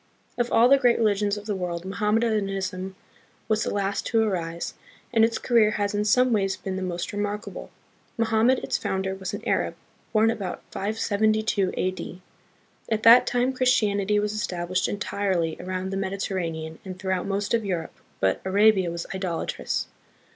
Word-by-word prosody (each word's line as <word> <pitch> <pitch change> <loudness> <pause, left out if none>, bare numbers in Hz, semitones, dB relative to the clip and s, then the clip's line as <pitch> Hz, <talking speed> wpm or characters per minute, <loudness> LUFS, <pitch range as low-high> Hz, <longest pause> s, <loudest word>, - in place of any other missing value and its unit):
Of 240 -1 -1
all 235 +2 +6
the 275 +1 +6
great 245 -3 +4
religions 205 -2 +1
of 205 - -8
the 210 -2 -2
world, 175 -2 -4
Mohammedanism 195 -2 -1 0.5
was 215 -1 +1
the - - -1
last 200 0 -1
to 225 -2 +3
arise, 170 -5 -2 0.4
and 225 -1 +5
its 225 0 +2
career 230 -3 +3
has 205 0 0
in 205 0 0
some 250 +3 +4
ways 195 -3 +1
been 190 +1 -5
the 190 - -3
most 180 0 -3
re 205 - -3
markable. 205 +1 -4 0.5
Mohammed, 230 +3 +3
its - - -1
founder, 190 0 -2
was 190 +1 -5
an - - -8
Arab, - - 0 0.4
born 220 0 +4
about 200 -6 -5
572 215 -1 0
A.D. 185 -1 -3 0.7
At 220 -1 0
that 230 +2 +8
time 250 +2 +1
Christianity 210 -5 +2
was 210 0 0
established 180 -3 -1
entirely 190 -5 -1
around 185 +1 -4
the 195 - -2
Mediterranean 185 -5 -3
and 185 -2 -7
throughout 190 -1 -2
most 200 +2 -1
of 230 -1 +2
Europe, 180 -5 -3 0.3
but 95 0 +1
Arabia 195 -1 +4
was 170 0 -4
idolatrous. 185 -3 -2
200 Hz, 160 wpm, -25 LUFS, 185-220 Hz, 0.7 s, that